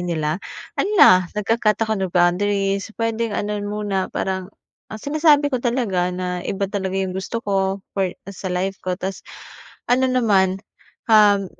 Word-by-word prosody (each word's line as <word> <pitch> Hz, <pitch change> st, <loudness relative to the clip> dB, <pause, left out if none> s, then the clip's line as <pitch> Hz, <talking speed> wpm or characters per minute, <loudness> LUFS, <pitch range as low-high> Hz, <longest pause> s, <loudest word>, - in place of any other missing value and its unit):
nila 165 Hz, 0 st, -2 dB, 0.4 s
hala, 185 Hz, -, +5 dB
nagka-cut 215 Hz, 0 st, +1 dB
ako 220 Hz, -2 st, -2 dB
ng 190 Hz, -, -1 dB
boundaries 195 Hz, +3 st, +1 dB
pwedeng 230 Hz, -1 st, -1 dB
ano 210 Hz, 0 st, -2 dB
muna 205 Hz, -2 st, -2 dB
parang, 190 Hz, -1 st, -3 dB, 0.4 s
ang 215 Hz, -, -7 dB
sinasabi 290 Hz, -1 st, +3 dB
ko 250 Hz, -, 0 dB
talaga 230 Hz, -8 st, 0 dB
na 180 Hz, 0 st, -3 dB
iba 200 Hz, 0 st, -1 dB
talaga 190 Hz, -1 st, -3 dB
yung 190 Hz, -1 st, -1 dB
gusto 190 Hz, +5 st, -4 dB
ko 195 Hz, -1 st, -1 dB
for 190 Hz, -2 st, 0 dB, 0.2 s
sa 190 Hz, 0 st, -6 dB
life 185 Hz, +2 st, -2 dB
ko 185 Hz, -1 st, -3 dB
tas 190 Hz, 0 st, -5 dB, 0.7 s
ano 260 Hz, +1 st, +3 dB
naman 200 Hz, -7 st, +2 dB, 0.6 s
um, 205 Hz, -2 st, +5 dB
195 Hz, 145 wpm, -21 LUFS, 185-220 Hz, 0.7 s, hala